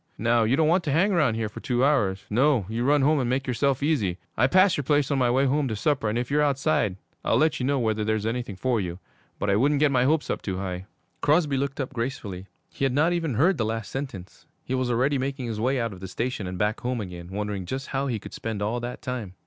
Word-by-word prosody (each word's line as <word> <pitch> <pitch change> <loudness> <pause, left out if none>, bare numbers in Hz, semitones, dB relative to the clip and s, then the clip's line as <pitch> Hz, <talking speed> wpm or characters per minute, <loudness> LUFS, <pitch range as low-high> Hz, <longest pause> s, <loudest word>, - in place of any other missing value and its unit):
Now, 115 0 +2
you 120 +4 +3
don't 155 +1 +3
want 175 +3 +3
to 145 - 0
hang 185 +8 +3
round 150 -10 +2
here 110 -1 -1
for 105 - -9
two 125 +1 +1
hours. 100 -10 +1
No, 125 -1 +2
you 115 +3 -2
run 145 +1 +3
home 150 +1 +3
and 125 -2 0
make 130 +2 0
yourself 135 +2 0
easy. 110 - +1 0.2
I 120 - +4
pass 185 +4 +5
your 145 - -2
place 145 0 +2
on 140 - +1
my 125 -2 +3
way 130 +3 +3
home 140 +1 +1
to 110 - -2
supper, 130 0 0
and 110 - -1
if 125 +2 -2
you're 150 +1 +3
outside 135 - +1 0.3
I'll - - +2
let 155 0 +2
you 125 - -1
know 140 0 +2
whether 110 -3 0
there's 110 0 0
anything 115 -3 -3
for 115 +4 0
you. 90 -2 -4 0.4
But 100 - 0
I - - +3
wouldn't 140 +6 +3
get 150 -1 +4
my 125 -2 +3
hopes 155 +2 +1
up - - -3
too 95 -2 -3
high.' 95 0 -5 0.3
Crosby 150 -1 +3
looked 135 +1 -2
up 135 0 -3
gratefully. 115 -7 -4 0.2
He - - -5
had 135 -2 +2
not 160 +5 +3
even 165 -7 -1
heard 170 - +3
the - - +2
last 115 -1 -3
sentence. 130 -10 -7 0.2
He 130 - -3
was 130 -1 0
already 130 +4 +1
making 135 0 -3
his 110 -2 -4
way 130 +3 +1
out 115 -3 -2
of 95 - -11
the 95 - -6
station 115 0 -3
and 90 0 -5
back 105 +3 0
home 125 0 -2
again, 90 -4 -7
wondering 100 -1 -4
just 135 +5 -4
how 140 +1 -1
he 120 -4 -1
could 100 - -10
spend 110 -2 -4
all 115 +4 -1
that 120 +1 -6
time. 115 -7 -5
125 Hz, 265 wpm, -25 LUFS, 110-140 Hz, 0.4 s, pass